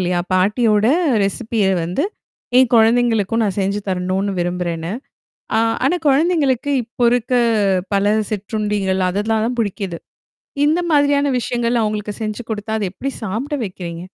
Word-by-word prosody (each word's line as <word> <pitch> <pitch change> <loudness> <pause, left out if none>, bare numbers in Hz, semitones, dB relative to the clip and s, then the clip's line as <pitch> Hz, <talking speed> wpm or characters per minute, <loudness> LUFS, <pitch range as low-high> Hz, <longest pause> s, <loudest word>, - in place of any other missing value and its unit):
இல்லையா? 180 -1 0
பாட்டியோட 210 +3 +2 0.4
ரெசிபிய 215 +1 -1 0.2
வந்து 180 - -1 0.5
என் 255 -2 +4
குழந்தைகளுக்கும் 225 -1 +3
நான் 195 -3 -2
செஞ்சு 200 +2 -1
தரணும்னு 190 +2 -1
விரும்புறேன்னு. 175 -1 -2 0.6
ஆ - - +3 0.3
ஆனா 340 - +2
குழந்தைங்களுக்கு 285 -2 +2
இப்போ 240 +2 -4
இருக்க 245 +1 0 0.6
பல 200 +1 +2 0.2
சிற்றுண்டிகள் 205 -2 -1
அதெல்லாம் 215 +3 0
தான் 245 +1 -3
பிடிக்குது. 195 -5 -3 0.7
இந்த 315 +4 +2
மாதிரியான 285 -1 +3
விஷயங்கள் 240 -1 0
அவங்களுக்கு 210 -1 -2
செஞ்சு 215 +2 -3
குடுத்தா, 215 0 -4
அத 205 - 0
எப்படி 275 +8 -4
சாப்பிட 235 +9 -3
வைக்கிறீங்க? 175 -2 -7
215 Hz, 125 wpm, -19 LUFS, 190-245 Hz, 0.7 s, என்